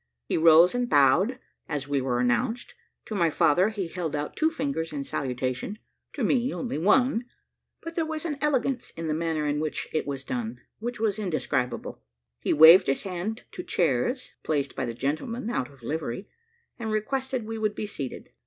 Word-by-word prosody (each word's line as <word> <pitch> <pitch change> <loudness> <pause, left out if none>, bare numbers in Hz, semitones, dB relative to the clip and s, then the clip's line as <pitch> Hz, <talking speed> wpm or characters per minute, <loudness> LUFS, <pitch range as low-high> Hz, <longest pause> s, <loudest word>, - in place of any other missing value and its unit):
He - - -1
rose 165 +2 +7
and 245 0 -1
bowed, 145 - +4 0.3
as 145 -2 -3
we 140 -1 0
were 125 -2 0
announced; 220 - 0 0.3
to - - -6
my 175 -5 +3
father 175 +6 +3
he 205 -5 -3
held 165 -3 -3
out 145 0 -3
two 315 - +3
fingers 275 - -2
in 145 -2 -3
salutation, 130 - -3 0.4
to - - -3
me 255 0 +2
only 240 - -3
one; 235 - +3 0.6
but 330 0 -6
there 330 -1 0
was 315 0 -4
an 295 -4 -3
elegance 275 -3 0
in 165 0 -3
the 155 - 0
manner 160 -1 -1
in 145 0 0
which 155 0 -2
it 155 - -1
was 140 -1 -4
done, 120 -2 -4 0.2
which 240 +1 -4
was 215 -1 0
indescribable. 145 - -2 0.4
He - - -1
waved 160 +4 +9
his 135 - 0
hand 195 +4 -4
to - - -6
chairs, 175 - 0
placed 145 -3 -1
by 130 - -1
the 115 -1 -4
gentleman 225 - -2
out 125 - -1
of 135 -4 -19
livery, 150 - -3 0.5
and 220 -2 -3
requested 260 +3 -1
we 225 0 -5
would 215 -1 0
be - - -3
seated. 140 -10 -6
175 Hz, 185 wpm, -27 LUFS, 145-235 Hz, 0.6 s, waved